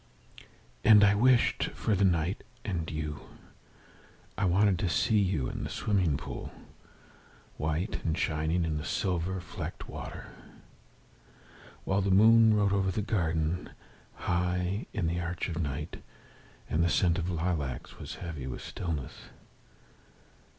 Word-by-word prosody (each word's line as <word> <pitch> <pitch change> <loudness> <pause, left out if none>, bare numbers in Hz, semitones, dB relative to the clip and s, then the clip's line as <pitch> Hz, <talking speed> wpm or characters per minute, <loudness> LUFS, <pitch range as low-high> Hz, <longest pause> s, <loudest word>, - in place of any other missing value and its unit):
And 105 -2 +8
I 100 0 +6
wished 120 +3 +3
for 110 - 0
night 90 -1 +1 0.2
and 85 -5 -2
you. 75 -2 -4 1.2
I 100 - 0
wanted 95 0 +3
to 95 - 0
see 105 +4 +2
you 90 -10 +1
in - - -5
the - - -4
swimming 90 -9 +1
pool, - - -7 1.1
White 80 +7 -2
and 80 -1 0
shining 80 +1 0
in 75 -2 -1
the - - -5
silver 90 +1 -1
flecked - - -7
water. - - -7 1.6
While 95 +1 +1
the 100 - 0
moon 110 +3 +6
rode 100 -1 +2
over 95 -1 +2
the 100 +3 -1
garden, 85 -4 -1 0.5
High 90 +3 -1
in 100 - -2
the 85 +2 0
arch 85 0 -3
of 85 0 -2
night, 75 +1 -4 0.7
And 80 +2 +1
the 85 - +2
scent 85 0 +2
of 85 - -2
the 90 - -2
lilacs 80 -6 -3
was - - -7
heavy 75 -7 -6
with 65 - -6
stillness. 80 -7 -5
90 Hz, 135 wpm, -30 LUFS, 80-100 Hz, 1.6 s, And